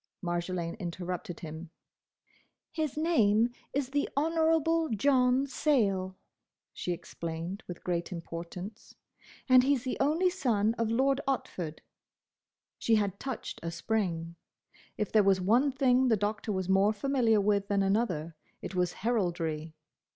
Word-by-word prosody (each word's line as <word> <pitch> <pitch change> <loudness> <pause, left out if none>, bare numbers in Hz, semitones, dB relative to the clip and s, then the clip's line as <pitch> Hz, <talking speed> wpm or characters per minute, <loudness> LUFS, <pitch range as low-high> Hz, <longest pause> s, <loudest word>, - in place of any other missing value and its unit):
Marjolaine 175 -1 -2
interrupted 180 0 -5
him. 160 +1 -7 1.0
"His 310 -3 -2
name 235 -8 +3 0.2
is 270 -1 -2
the 285 +1 0
Honourable 325 +1 +2
John 255 +3 +3
Sayle," 200 -10 +1 0.6
she 180 - -3
explained 170 +2 -5
with 175 - -8
great 175 0 -2
importance, 175 +4 -7 0.5
"and 255 -1 +7
he's 265 -1 +1
the 255 - -3
only 320 +7 +2
son 225 - +1
of 230 -1 +1
Lord 265 +4 +2
Otford." 175 - -3 1.0
She 225 - +3
had 200 -2 0
touched 265 -4 -5
a 170 - -3
spring. 170 -2 -2 0.6
If 210 - -2
there 215 - +5
was 195 -1 +3
one 235 +10 +3
thing 260 -1 +3
the 225 -3 +3
Doctor 210 +2 -2
was 190 -2 -2
more 195 +2 +4
familiar 230 -1 +2
with 200 0 +1
than 200 -1 +2
another, 185 -6 0 0.3
it - - -5
was 180 -1 0
heraldry. 165 -8 -1
210 Hz, 130 wpm, -30 LUFS, 180-260 Hz, 1.0 s, and